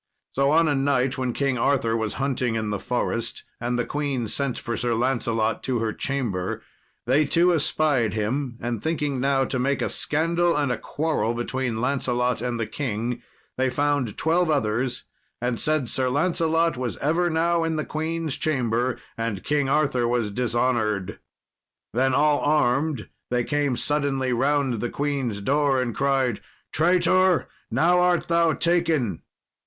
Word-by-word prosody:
So 140 +1 +2
on 165 +2 +4
a 145 - +2
night, 135 -2 +1
when 130 -1 0
King 135 -1 -1
Arthur 115 -3 +1
was 110 -2 -2
hunting 130 -3 -1
in 110 -1 -2
the 105 - -2
forest, 115 0 -2 0.2
and 120 +1 -1
the 120 - 0
queen 140 -5 -2
sent 140 +2 -1
for 115 - -4
Sir 120 0 0
Lancelot 115 -3 0
to 130 -2 0
her 110 -1 -1
chamber, 115 -10 -2 0.4
they 135 +5 +3
two 170 +4 +3
espied 145 - +1
him; 120 +4 -2
and 120 -1 -3
thinking 150 -4 -1
now 135 0 +2
to 130 - -2
make 135 +2 +1
a - - -1
scandal 170 +2 +1
and 145 -3 +1
a - - -1
quarrel 150 -7 -1
between 120 -1 -2
Lancelot 125 -2 0
and 120 -1 -2
the 115 - 0
king, 120 -2 -3 0.4
they 130 0 +2
found 145 -3 0
twelve 170 +2 +2
others, 125 -3 0 0.4
and 125 -1 -1
said 155 -4 +1
Sir 130 +2 +1
Lancelot 165 +2 +1
was 125 -2 -3
ever 165 +5 +1
now 165 +1 +1
in 165 -1 -1
the 155 -2 -2
queen's 160 +1 -2
chamber, 125 -4 0 0.2
and 115 -5 -2
King 145 -2 0
Arthur 135 -5 +2
was 120 -3 0
dishonoured. 120 -4 0 0.7
Then, 130 +2 +2
all 150 0 +3
armed, 145 -2 +1 0.2
they 125 0 +1
came 145 -2 0
suddenly 140 -3 0
round 135 -1 +1
the 120 - -1
queen's 135 -8 -2
door, 140 +3 +2
and 125 -2 -1
cried, 135 -4 0 0.3
"Traitor! 180 +2 +3 0.2
now 175 +2 +3
art 180 -1 +2
thou 170 -1 +3
taken." 160 - +1
135 Hz, 160 wpm, -24 LUFS, 120-150 Hz, 0.7 s, on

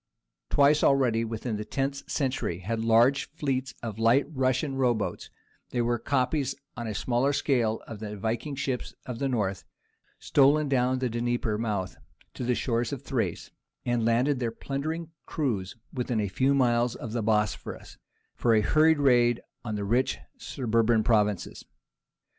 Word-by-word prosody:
Twice 145 +1 +4
already, 125 -5 +3
within 115 0 -3
the 105 - -4
tenth 135 +5 -3
century, 130 - -1
had 110 +4 -2
large 120 +5 +4
fleets 135 -4 -2
of 110 -2 -5
light 115 +5 +4
Russia 130 0 +1
row 130 -3 +2
boats—they 110 +3 -6
were 120 0 0
copies 135 +2 0 0.2
on 120 -2 -5
a 110 - -4
smaller 125 +5 +1
scale 120 -6 +1
of 110 - -8
the 105 -1 -6
Viking 115 +7 -2
ships 130 -2 -3
of 125 -2 -6
the 140 - 0
North—stolen 135 +6 0
down 130 -1 +2
from 130 - 0
the - - -4
Dnieper 120 -1 -1
mouth 100 -5 -2 0.4
to - - -6
the 125 0 +1
shores 115 -1 -1
of 140 -2 -5
Thrace, 130 -4 -2 0.3
and 120 -1 +1
landed 125 +4 +2
their 120 -2 0
plundering 155 +7 -4 0.2
crews 110 - -2 0.2
within 125 -3 -1
a 105 - 0
few 130 +9 +2
miles 120 -2 +2
of 115 - -7
the 120 - -1
Bosphorus, 105 -1 -1 0.3
for 115 -2 +2
a 110 - +4
hurried 155 +6 +4
raid 120 -4 +4 0.2
on 110 -3 -3
the 100 -1 -3
rich 120 +6 +1 0.2
suburban 115 -2 +1
provinces. 105 -4 +1
120 Hz, 155 wpm, -27 LUFS, 110-135 Hz, 0.4 s, Twice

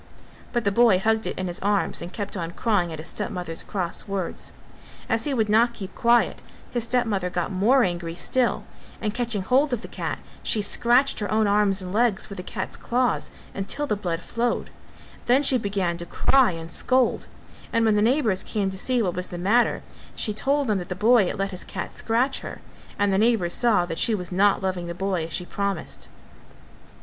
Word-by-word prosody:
But 240 -2 0
the 200 - +1
boy 230 -2 +5
hugged 220 +3 +1
it - - -4
in 185 - -2
his 175 -1 -3
arms 205 0 0
and 170 +1 -6
kept 205 -1 -5
on 170 -2 -4
crying 200 -7 0
at 160 - -5
his 155 +2 -7
stepmother's 180 -6 -4
cross 185 -2 -4
words. 195 -3 -3 0.6
As 225 0 0
he 290 - -1
would 220 -3 +1
not 235 +3 +3
keep 195 -2 -8
quiet 235 0 +2 0.3
his 240 -2 -1
stepmother 225 -7 0
got 175 +1 -2
more 230 +8 +4
angry 175 -2 -2
still; 250 +7 0 0.4
and 210 -2 -2
catching 235 -4 -1
hold 265 +6 +2
of 240 - -2
the - - -6
cat - - -4 0.2
she 220 - +1
scratched 240 +6 +3
her 205 - -3
own 215 0 +3
arms 200 -2 +2
and 180 0 -6
legs 225 -2 +1
with 200 - -7
the 180 - -5
cat's - - -5
claws 245 +1 0 0.2
until 200 +9 -2
the 245 - 0
blood 180 -4 -3
flowed; 235 +4 -2 0.6
then 255 +4 +4
she 265 -2 +3
began 195 -5 -1
to 170 0 -6
cry 265 +6 +3
and 165 -2 -6
scold 255 +7 +2 0.4
and 230 0 +2
when 215 -1 +3
the 210 - +3
neighbours 230 -4 +2
came 200 -3 -2
to 190 - -5
see 250 +2 +1
what 180 -3 -1
was 180 0 -3
the 175 - -7
matter, 215 +7 +2 0.3
she 215 - 0
told 280 +6 +1
them 210 -5 +1
that 175 - -7
the 180 - -3
boy 215 0 +4
had - - -3
let 195 0 -1
his 185 - -4
cat 190 - -6
scratch 245 +4 +1
her; - - -8 0.4
and 200 -1 +2
the 190 - +2
neighbours 215 -6 +2
saw 220 -7 +3
that 165 -2 -4
she 225 - +3
was 180 -3 -5
not 195 +2 +3
loving 185 -2 -2
the 170 - -5
boy 185 -3 -1
as 165 - -9
she 180 - -1
promised. 200 +1 -4
205 Hz, 210 wpm, -24 LUFS, 185-235 Hz, 0.6 s, boy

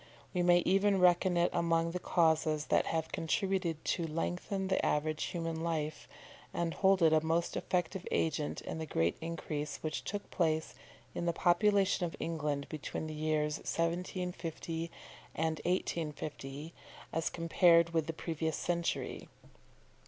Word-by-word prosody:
We 180 - +1
may 175 0 +5
even 195 +1 +3
reckon 180 0 +4
it 170 0 +3
among 165 0 +2
the 180 - -3
causes 160 -3 +2
that - - +4
have 160 -1 -1
contributed 175 -1 -1
to 170 -2 0
lengthen 180 +5 -2
the 190 - +1
average 155 +1 0
of - - -4
human 165 -2 -3
life, 155 -2 -2 0.5
and 170 -1 0
hold 190 -2 +3
it 160 -1 +6
a 155 0 +4
most 165 +1 0
effective 180 +1 -1
agent 155 -2 0
in 160 - -5
the 160 - -4
great 85 - +1
increase 155 -3 -4
which 155 -1 -2
took 205 +1 -5
place 160 -2 0 0.4
in 175 - -2
the 170 - +2
population 195 +3 +3
of 170 - -2
England 150 -4 -2
between 155 0 -5
the 155 - -5
years 150 0 0
1750 170 -1 -3 0.5
and 160 0 -1
1850 155 -4 -3 0.4
as 165 0 0
compared 170 0 +4
with 160 -2 0
the - - 0
previous 160 -1 -2
century. 170 -1 -2
165 Hz, 145 wpm, -33 LUFS, 155-175 Hz, 0.5 s, it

